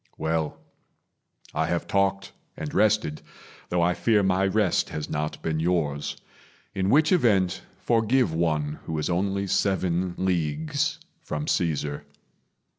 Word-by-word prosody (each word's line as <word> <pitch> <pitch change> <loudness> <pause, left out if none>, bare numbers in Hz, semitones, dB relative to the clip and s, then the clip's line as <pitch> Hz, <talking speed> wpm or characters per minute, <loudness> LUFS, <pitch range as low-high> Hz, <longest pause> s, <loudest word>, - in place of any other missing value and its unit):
Well, 80 -1 -1 1.0
I - - 0
have 85 -1 -1
talked 95 0 +1 0.3
and 75 -2 -5
rested, 105 -8 +2 0.5
though 90 -1 +2
I 90 +1 +3
fear 105 +2 +2
My 95 +1 +2
rest 95 -2 +1
has 75 - -4
not 75 0 -2
been 80 -1 -1
yours; 80 -4 -1 0.6
in 95 -1 0
which 155 - +4
event, 105 - +3 0.2
Forgive 115 -3 +2
one 75 -3 0
who 80 - -3
is 75 +3 -1
only 100 +2 0
seven 90 -2 0
leagues 95 - 0 0.2
From 75 0 -4
Caesar. 75 -4 -1
90 Hz, 125 wpm, -26 LUFS, 80-100 Hz, 1.0 s, which